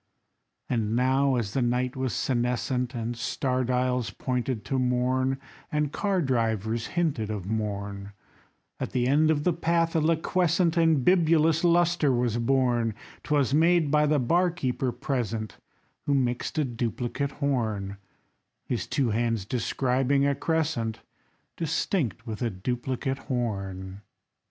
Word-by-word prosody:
And 115 -2 0
now 130 +2 +3
as 110 -4 -2
the 135 - +1
night 125 +2 0
was 130 -1 -1
senescent, 125 0 -1
And 120 +1 -3
star 130 +2 -1
dials 125 -1 0
pointed 125 -3 -3
to 135 - -1
morn, 130 +1 +1 0.3
And 150 -2 0
car 195 -2 0
drivers 115 -3 0
hinted 140 -11 0
of 105 -4 -4
morn, 100 -1 -3 0.7
At - - -4
the 125 -1 +1
end 150 +4 +4
of 150 -2 +2
the 180 - +2
path 165 0 +1
a - - +4
liquescent 165 +1 +2
And 160 -5 +3
bibulous 165 -2 +4
lustre 170 -3 +3
was 120 -2 +1
born; 120 -3 +1 0.3
'Twas 140 -3 +1
made 165 -1 +4
by 150 0 +4
the 150 0 +3
bar 170 +8 +2
keeper 130 -6 -2
present, 115 -5 -3 0.5
Who 140 - +3
mixed 125 +2 -1
a 155 - +2
duplicate 120 +3 -3
horn, 110 -8 -1 0.7
His - - -2
two 130 -5 0
hands 115 -2 0
describing 130 +3 +1
a 140 - +3
crescent 140 -7 -1 0.6
Distinct 150 - -1
with 110 -1 -6
a 120 - +1
duplicate 125 +6 -3
horn. 95 -6 -3
130 Hz, 135 wpm, -27 LUFS, 115-150 Hz, 0.7 s, end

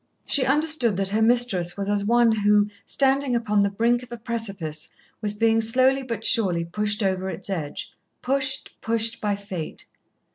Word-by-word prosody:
She 265 -3 +1
understood 275 - +2
that 195 -1 -1
her 215 +2 0
mistress 220 -7 +2
was 200 0 -3
as 205 0 0
one 235 +2 +4
who, 210 -1 +3 0.2
standing 270 -1 +2
upon 210 -3 +1
the 200 0 +3
brink 235 +4 +1
of 250 - -13
a 240 - -6
precipice, 200 -10 -5 0.3
was 210 -1 -2
being 225 +1 +2
slowly 255 +4 +3
but 230 -4 -5
surely 180 -7 +2
pushed 210 +4 -1
over 190 -1 -1
its 195 +1 -5
edge 155 -6 -5 0.3
pushed, 270 +1 -1
pushed 225 0 -1
by 205 -1 0
Fate. 195 -5 -7
220 Hz, 170 wpm, -24 LUFS, 200-240 Hz, 0.3 s, one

